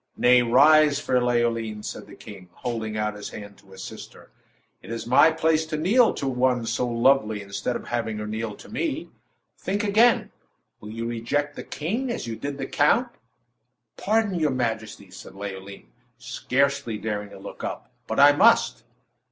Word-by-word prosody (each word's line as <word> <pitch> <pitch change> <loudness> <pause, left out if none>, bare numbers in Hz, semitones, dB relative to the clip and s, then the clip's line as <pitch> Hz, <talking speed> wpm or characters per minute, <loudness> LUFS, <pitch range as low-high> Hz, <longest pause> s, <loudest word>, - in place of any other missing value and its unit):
"Nay; 125 0 +5
rise, 145 +4 +5
fair 125 -3 +1
Leoline," 115 -3 0
said - - -7
the - - -13
king, 95 -4 -12
holding 110 -1 -4
out 105 0 -1
his 105 0 -7
hand 100 -1 -10
to 95 - -22
assist 95 - -9
her. - - -18 0.5
"It - - -13
is 115 0 -5
my 130 +6 +6
place 160 0 +1
to 155 -1 -3
kneel 220 +10 +4
to 140 - -3
one 125 -2 +1
so 115 +2 -1
lovely 115 -2 +2
instead 100 +5 -3
of - - -6
having 115 -2 -2
her 105 - -4
kneel 110 0 -4
to - - -14
me. 305 +6 -3 0.5
Think 205 +2 -2
again. 220 +4 +3 0.5
Will 105 - -10
you 115 +1 -5
reject 120 +5 -2
the - - -6
king 225 - -3
as 235 - -3
you 115 -1 -5
did 140 +4 -5
the 135 - -4
count?" 230 - +2 0.9
"Pardon, 215 -5 0
your 155 -2 +2
majesty!", 110 -6 -3
said 95 - -12
Leoline, 100 0 -8 0.3
scarcely 130 0 -1
daring 105 -1 -4
to - - -12
look 95 - -10
up; - - -6 0.2
"but - - -2
I - - +9
must!" - - +3
120 Hz, 175 wpm, -24 LUFS, 110-150 Hz, 0.9 s, I